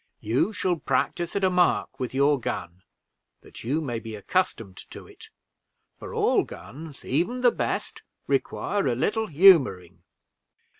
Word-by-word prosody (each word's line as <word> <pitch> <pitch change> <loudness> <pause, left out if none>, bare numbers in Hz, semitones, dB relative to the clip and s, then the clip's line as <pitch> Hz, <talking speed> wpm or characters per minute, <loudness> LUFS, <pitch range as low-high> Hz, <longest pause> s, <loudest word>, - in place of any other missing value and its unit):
You 120 - 0
shall 185 -3 -1
practice 145 +5 -1
at 200 - -1
a 185 - +3
mark 180 -6 +1
with 125 -2 -3
your 140 +1 +2
gun, 90 -5 -5 0.6
that - - -13
you 140 +7 -1
may 120 -6 -3
be 110 -1 -8
accustomed 110 - -2
to - - -11
it; - - -15 0.6
for - - -10
all - - +3
guns, 150 0 -11
even 180 - -1
the 245 -1 +5
best, - - -3 0.2
require 200 -7 -1
a 120 - +1
little 220 - 0
humoring." 145 - +4
145 Hz, 145 wpm, -25 LUFS, 120-185 Hz, 0.6 s, the